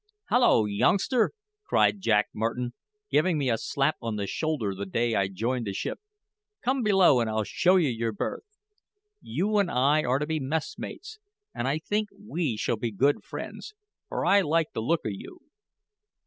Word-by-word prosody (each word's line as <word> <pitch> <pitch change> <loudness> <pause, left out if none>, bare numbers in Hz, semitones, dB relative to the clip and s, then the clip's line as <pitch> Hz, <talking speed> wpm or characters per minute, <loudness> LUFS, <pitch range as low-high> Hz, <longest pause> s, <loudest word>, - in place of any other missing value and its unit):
"Hallo, 240 - +4
youngster!" 200 - +2 0.3
cried 205 - +2
Jack 105 - +2
Martin, 120 +3 -2 0.4
giving 170 +1 +3
me 135 -4 +1
a 115 - +1
slap 140 +2 0
on 115 -2 -3
the 100 -1 -2
shoulder 135 -5 -2
the 100 +1 -5
day 115 +4 0
I 100 -2 +2
joined 115 +5 -2
the 100 - -2
ship, - - -4 0.6
"come 260 +2 +1
below 190 - +5
and 115 -2 0
I'll 110 0 0
show 180 - +2
you 170 -6 +3
your 115 -1 -1
berth. 105 - -3 0.8
You 200 - 0
and 195 -3 +2
I 140 +5 +3
are 125 -1 +2
to 150 - -1
be 160 0 -1
messmates; 160 - -5 0.3
and 120 - -2
I 140 +3 +1
think 210 +6 -2
we 170 - -2
shall 115 - -1
be 115 +1 -2
good 140 +8 +1
friends, 430 - -8 0.3
for - - -2
I 200 +1 +5
like 165 -2 +1
the 110 - -2
look 165 +9 +1
o' - - 0
you." 345 - -10
140 Hz, 175 wpm, -27 LUFS, 115-185 Hz, 0.8 s, below